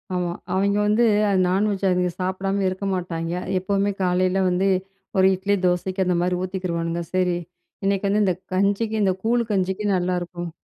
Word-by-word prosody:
ஆமா, 175 -1 -1 0.2
அவய்ங்க 200 +2 +2
வந்து 215 +3 +3 0.2
அது 195 -2 +2
நான்வெஜ் 195 +1 +1
அதுக 180 0 +1
சாப்பிடாம 195 +2 -1
இருக்க 185 +2 -5
மாட்டாய்ங்க. 170 -2 -3 0.2
எப்பவுமே 200 +2 0
காலையில 185 +1 +2
வந்து, 180 +2 +1 0.5
ஒரு 190 - +6
இட்லி 200 +2 0
தோசைக்கு 185 +2 0
அந்த 180 -1 +1
மாரி 180 0 0
ஊத்திக்கிருவானுங்க. 170 -2 -2
சரி 180 -1 +1 0.5
இன்னைக்கு 200 0 +1
வந்து 205 +1 +2
இந்த 185 -2 +1 0.2
கஞ்சிக்கு, 200 +3 +1
இந்த 190 - +3
கூழ் 235 +1 +2
கஞ்சிக்கும் 195 +1 0
நல்லாருக்கும், 175 -1 -3
185 Hz, 150 wpm, -23 LUFS, 180-200 Hz, 0.5 s, ஒரு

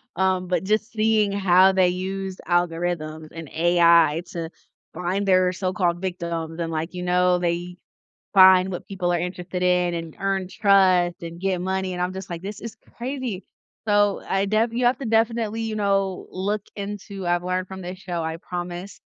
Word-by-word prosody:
Um, 185 -1 +1
but 180 +1 0
just 215 +4 0
seeing 215 -2 +2
how 190 -1 +5
they 185 -1 +3
used 190 +1 -4
algorithms 165 -3 -1
and 165 -3 -8
AI 170 -1 +4
to 165 -2 -4 0.4
find 185 +3 -2
their 185 -1 +4
so-called 180 -1 -1
"victims," 170 -3 -4
and, 165 -1 -2
like, 160 +3 -3
you 180 0 -5
know, 180 0 +3
they 175 +1 -2 0.6
find 190 -1 +7
what 180 - -6
people 180 -3 -2
are 175 - +1
interested 180 +1 -4
in 180 -1 +2
and 165 -2 -6
earn 195 -1 -1
trust 185 -4 +3
and 170 +1 -7
get 190 -2 0
money, 190 0 -2
and 180 - -3
I'm 180 +1 -1
just 190 0 -8
like, 170 0 -5
"This 205 +2 -6
is 230 -1 -7 0.2
crazy." 245 -5 -4 0.4
So, 205 -1 +2
I 195 +1 +1
def 220 +3 +1
you 240 +1 +1
have 245 - +3
to 275 - -6
definitely, 225 0 +1
you 225 -1 -3
know, 195 -2 0
look 200 +2 -2
into 200 -2 -6
I've 175 0 +1
learned 185 0 -2
from 190 -1 -8
this 180 +1 -7
show, 175 -3 -4
I 160 0 -3
promise 175 +2 -6
185 Hz, 180 wpm, -23 LUFS, 175-195 Hz, 0.6 s, find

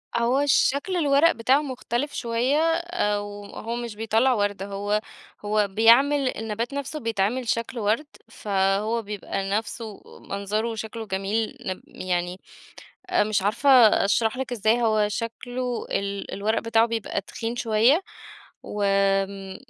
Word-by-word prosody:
هو 250 +5 +2
شكل 285 +5 +2
الورق 295 0 +4
بتاعه 255 +5 +2
مختلف 260 0 -3
شويّة، 240 +4 0
آآ 330 - +1
وهو 205 +3 -6
مش 235 -3 -5
بيطلّع 225 +4 +2
ورد، 205 -3 -1
هو 205 +1 -1 0.4
هو 210 0 +2
بيعمل 255 +6 +4
النَبات 225 +3 -3
نفْسه 280 +2 -4
بيتعمل 230 +1 -1
شكل 230 +1 -1
ورد، 220 +8 +1 0.2
فهو 205 +2 0
بيبقى 200 -2 -4
نفْسه 220 +1 -4 0.3
منظره 210 +3 -2
وشكله 225 0 -6
جميل، 205 +6 -2
نب 185 -6 -5
يعني 180 0 -3 0.7
آآ 360 - +3
مش 210 -1 0
عارفة 220 +8 +1 0.4
أشرح 220 +4 +1
لِك 265 -1 -4
إزاي 225 +1 +2
هو 215 -2 +2
شكله 245 +3 -4
ال 200 0 -3
الورق 215 +3 0
بتاعه 230 0 +3
بيبقى 230 -2 -3
تخين 230 +1 -5
شويّة، 235 - +3 0.6
و 210 - -5
آمم 195 -1 +1
225 Hz, 130 wpm, -25 LUFS, 205-250 Hz, 0.7 s, الورق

